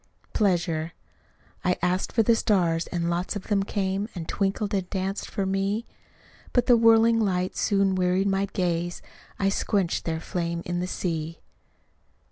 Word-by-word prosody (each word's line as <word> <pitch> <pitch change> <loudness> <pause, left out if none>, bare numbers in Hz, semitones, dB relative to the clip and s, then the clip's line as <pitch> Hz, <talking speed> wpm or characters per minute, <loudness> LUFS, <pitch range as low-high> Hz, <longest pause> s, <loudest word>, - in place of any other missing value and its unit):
Pleasure 175 -5 +1 0.7
I 180 0 +1
asked 180 +1 0
for 225 - +3
the 230 +2 +4
stars 175 -7 +1
and 170 -2 -2
lots 175 +4 -1
of 205 - -6
them 205 -2 +3
came, 195 +1 -2
And 165 -2 -5
twinkled 200 +1 -1
and 190 -2 -1
danced 195 0 -3
for 195 - -2
me; 195 +4 -1 0.7
But 245 -1 +3
the 245 - +6
whirling 230 0 +5
lights 185 -4 0
soon 195 -2 +2
wearied 185 +1 +1
my 195 0 +1
gaze 175 -2 -2 0.3
I 195 - +2
squenched 195 -2 0
their 160 -1 -1
flame 170 -1 -3
in 175 0 -2
the 180 - -2
sea. 165 -3 -3
190 Hz, 155 wpm, -26 LUFS, 175-200 Hz, 0.7 s, the